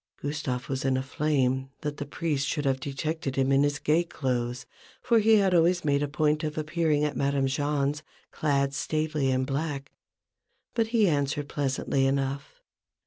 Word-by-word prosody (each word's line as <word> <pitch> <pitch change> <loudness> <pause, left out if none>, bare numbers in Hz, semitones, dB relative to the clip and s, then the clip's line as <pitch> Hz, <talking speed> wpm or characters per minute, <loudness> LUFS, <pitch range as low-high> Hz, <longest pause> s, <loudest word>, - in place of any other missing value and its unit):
Gustave 140 -4 -3
was 135 -1 -2
in 130 -1 +2
a 130 - -1
flame 135 -2 0
that 150 -1 -4
the 145 - -5
priest 145 -2 -1
should 150 - -2
have 135 -1 +1
detected 140 +1 -3
him 135 0 +2
in 135 0 +4
his 145 0 +1
gay 155 +3 +2
clothes, 125 -5 -2 0.3
for 230 -1 +3
he 220 0 +5
always 175 -3 +3
made 140 -1 +2
a 145 - 0
point 150 +1 +1
of 155 0 -3
appearing 155 -1 +1
at 150 - -1
Madame 140 -1 +1
Jahn's 145 +1 0 0.3
clad 140 -2 0
staidly 155 -1 -1
in 130 0 +1
black; 140 0 -3 0.8
but 230 -1 +1
he 225 -3 +3
answered 145 -2 0
pleasantly 135 -1 0
enough. 140 - -2
145 Hz, 165 wpm, -27 LUFS, 135-155 Hz, 0.8 s, he